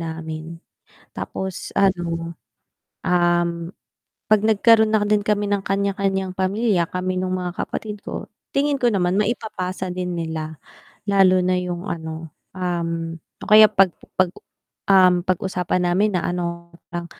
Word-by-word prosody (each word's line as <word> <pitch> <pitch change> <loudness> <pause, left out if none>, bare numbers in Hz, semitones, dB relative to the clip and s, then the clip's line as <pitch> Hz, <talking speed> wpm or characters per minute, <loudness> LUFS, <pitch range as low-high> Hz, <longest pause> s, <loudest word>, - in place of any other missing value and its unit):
namin 160 0 -6 0.6
tapos 190 -1 -6
ano, 170 -3 0 0.7
um, 175 -1 +3 0.8
'pag 215 -1 +5
nagkaroon 220 0 +5
na 215 - +4
din 210 0 +2
kami 205 -1 +1
ng 200 -1 0
kanya-kanyang 195 -1 0
pamilya 190 -1 +1
kami 185 0 -2
nung 185 0 -1
mga 180 0 -5
kapatid 210 -2 -6
ko - - -6 0.2
tingin 285 +1 +1
ko 245 - +4
naman 185 -3 +1
maipapasa 190 -4 -2
din 180 0 -3
nila 160 -1 -4 0.5
lalo 190 -2 +5
na 185 0 +2
'yong 180 -1 -4
ano, 160 -1 -5 0.2
um 165 -2 -2 0.3
o - - -11
kaya 215 0 +9
pag 190 -2 +4 0.3
pag 185 -1 +4 0.6
um, 185 -2 +6
pag-usapan 180 0 -1
namin 200 +2 +2
na 175 - -1
ano 170 -1 -4 0.2
lang 175 0 -4
185 Hz, 135 wpm, -22 LUFS, 170-200 Hz, 0.8 s, kaya